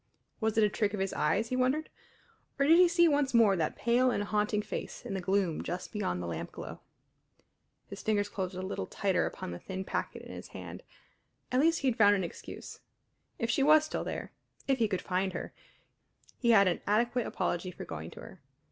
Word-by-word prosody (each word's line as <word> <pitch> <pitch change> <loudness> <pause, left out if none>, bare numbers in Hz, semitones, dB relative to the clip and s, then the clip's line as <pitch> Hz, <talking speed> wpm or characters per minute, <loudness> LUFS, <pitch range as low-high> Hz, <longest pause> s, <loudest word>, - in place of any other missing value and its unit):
Was 220 -1 0
it 220 - +5
a 210 - +4
trick 210 0 0
of - - -5
his 195 0 -1
eyes, 190 +10 +1
he 255 - -1
wondered, 260 +5 +1 0.7
or 275 - +3
did 325 +4 +7
he 360 - +8
see 340 0 +4
once 285 -4 +2
more 220 -4 +6
that 160 -4 -1
pale 245 +2 +3
and 205 - 0
haunting 210 0 0
face 215 - -6
in 225 - -4
the 190 - -2
gloom 190 -3 +1
just 180 +1 -5
beyond 90 - -2
the - - -4
lampglow? 85 -2 -6 1.1
His - - -8
fingers 205 -2 +1
closed 190 -2 -4
a 185 - -4
little 185 - -4
tighter - - 0
upon - - -6
the 85 - -6
thin 190 0 -5
packet - - -3
in - - -9
his - - -8
hand. - - -8 0.7
At 255 - +2
least 325 +3 +3
he 275 - +1
had 240 -1 -3
found 205 -1 +7
an 190 - -1
excuse; 170 - -8 0.6
if 230 0 0
she 275 - +1
was 305 +2 +6
still 310 - -3
there - - -5 0.4
if 270 -1 +2
he 225 - +3
could 190 -3 -2
find 185 0 -1
her - - -5 0.9
he 235 - +1
had 200 -4 +7
an 175 - 0
adequate 235 +3 +1
apology 180 -1 -2
for 180 - -8
going 80 +1 -6
to - - -11
her. - - -12
210 Hz, 210 wpm, -31 LUFS, 190-255 Hz, 1.1 s, he